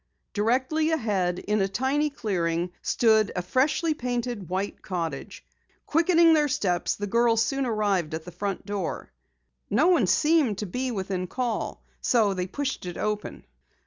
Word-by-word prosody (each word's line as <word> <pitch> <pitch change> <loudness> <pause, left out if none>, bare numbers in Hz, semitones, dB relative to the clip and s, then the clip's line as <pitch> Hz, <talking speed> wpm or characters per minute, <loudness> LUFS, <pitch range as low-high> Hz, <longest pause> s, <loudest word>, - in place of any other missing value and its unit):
Directly 260 +9 +1
ahead, 205 - 0
in 210 +2 0
a 195 - +2
tiny 270 +8 0
clearing, 175 - -1
stood 220 -3 +3
a 180 - -1
freshly 295 - +1
painted 245 - -3
white 190 +2 -3
cottage. 165 -7 -5 0.4
Quickening 335 +1 +4
their 300 -2 +3
steps, 180 -9 0
the 205 - -4
girls 230 +2 +3
soon 270 +1 -1
arrived 200 -8 0
at 160 - -7
the 180 - -8
front 195 +2 -4
door. 200 -4 -4 0.6
No 285 - +3
one 305 - +4
seemed 295 - +3
to 210 - -3
be 250 +8 -3
within 190 -4 -3
call, 240 +2 -3 0.2
so 220 -5 +3
they 180 -1 -2
pushed 270 -2 -3
it 175 - -6
open. 210 0 -3
215 Hz, 150 wpm, -26 LUFS, 185-265 Hz, 0.6 s, Quickening